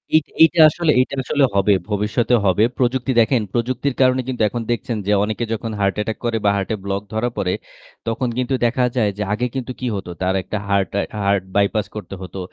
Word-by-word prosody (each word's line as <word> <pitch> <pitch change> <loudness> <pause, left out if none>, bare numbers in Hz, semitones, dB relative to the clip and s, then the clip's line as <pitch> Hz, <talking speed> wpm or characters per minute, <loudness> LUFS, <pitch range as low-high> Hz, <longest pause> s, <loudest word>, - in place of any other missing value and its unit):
Eight 155 - +4 0.2
এইটা 165 +1 +4
আসলে 165 +1 +1
এইটা 130 +2 +1
আসলে 145 +2 +1
হবে, 100 +1 +4 0.2
ভবিষ্যতে 105 +4 +1
হবে। 95 +2 +3
প্রযুক্তি 125 0 0
দেখেন 115 +1 +3
প্রযুক্তির 125 +3 -1
কারণে 130 0 +4
কিন্তু 130 -3 -3
এখন 120 - -4
দেখছেন 120 0 -2
যে - - +2
অনেকে 110 +2 -2
যখন 115 0 -4
হার্ট 100 -1 +1
অ্যাটাক 105 +1 -2
করে 115 -1 +1
বা - - +6
হার্টে 100 +2 -2
ব্লক 100 0 -1
ধরা 110 +3 0
পড়ে, 90 - 0 0.5
তখন 115 +3 -1
কিন্তু 130 +1 -1
দেখা 125 +2 +2
যায় 110 -5 +2
যে 105 - -1
আগে 115 +4 0
কিন্তু 130 -1 -3
কি 125 - -3
হতো? 95 -3 -5
তার 95 0 +1
একটা 105 - -4
হার্ট 100 -1 +2
অ্যা 105 +1 -3
হার্ট 100 -1 +2
বাইপাস 100 +1 +2
করতে 100 -2 -6
হতো। 95 +1 -7
115 Hz, 205 wpm, -20 LUFS, 100-125 Hz, 0.5 s, বা